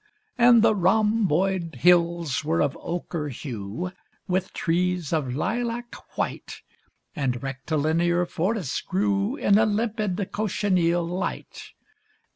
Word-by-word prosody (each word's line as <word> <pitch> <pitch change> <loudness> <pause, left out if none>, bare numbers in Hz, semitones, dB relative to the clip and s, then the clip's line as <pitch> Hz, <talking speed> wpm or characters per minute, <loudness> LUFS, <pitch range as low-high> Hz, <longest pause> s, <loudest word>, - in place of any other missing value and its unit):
And 240 -2 +6
the 220 - +5
rhomboid 190 -4 +1
hills 170 -4 +3
were 160 +2 0
of 145 0 +1
ochre 170 -3 -4
hue 120 - -5 0.4
With 185 0 -1
trees 175 -1 -1
of 135 -6 -1
lilac 235 - -2 0.2
white, - - -4 0.5
And 125 -4 -2
rectilinear 160 +6 0
forests 180 - -2
grew 200 +4 0
In 200 -8 +3
a 220 - +4
limpid 210 -3 -1
cochineal 185 -5 +1
light. 180 +3 -4
180 Hz, 105 wpm, -25 LUFS, 160-205 Hz, 0.5 s, And